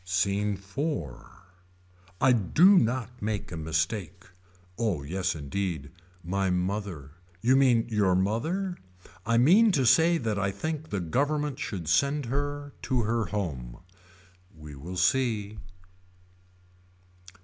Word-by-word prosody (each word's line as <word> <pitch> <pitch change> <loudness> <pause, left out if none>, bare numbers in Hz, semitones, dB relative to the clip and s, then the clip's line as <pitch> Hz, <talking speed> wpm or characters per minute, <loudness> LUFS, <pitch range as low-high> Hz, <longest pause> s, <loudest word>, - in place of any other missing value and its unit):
SCENE 100 +3 0
IV. 100 - -4 1.1
I 130 - +5
do 165 - +5
not 125 +1 -2
make 105 -2 -3
a - - -5
mistake. 80 +4 -2 0.5
Oh 100 -11 -1
yes 95 +4 -2
indeed. 80 0 -4 0.3
My 95 +3 -1
mother. 90 -5 -3 0.3
You 130 +3 +4
mean 125 -4 +4
your 105 -5 +2
mother. 160 - -1 0.5
I 115 0 +3
mean 195 - +6
to 135 -5 +2
say 165 +8 +5
that 110 -7 -2
I 100 -1 0
think 155 +8 -4
the 100 - -2
government 145 - -1
should 90 -6 -5
send 140 - +2
her 145 +3 -3
to 125 -3 0
her 115 +1 0
home. 70 -13 -4 0.8
We 75 -1 -10
will 85 +7 -7
see. 105 0 +1
105 Hz, 120 wpm, -27 LUFS, 90-130 Hz, 1.1 s, mean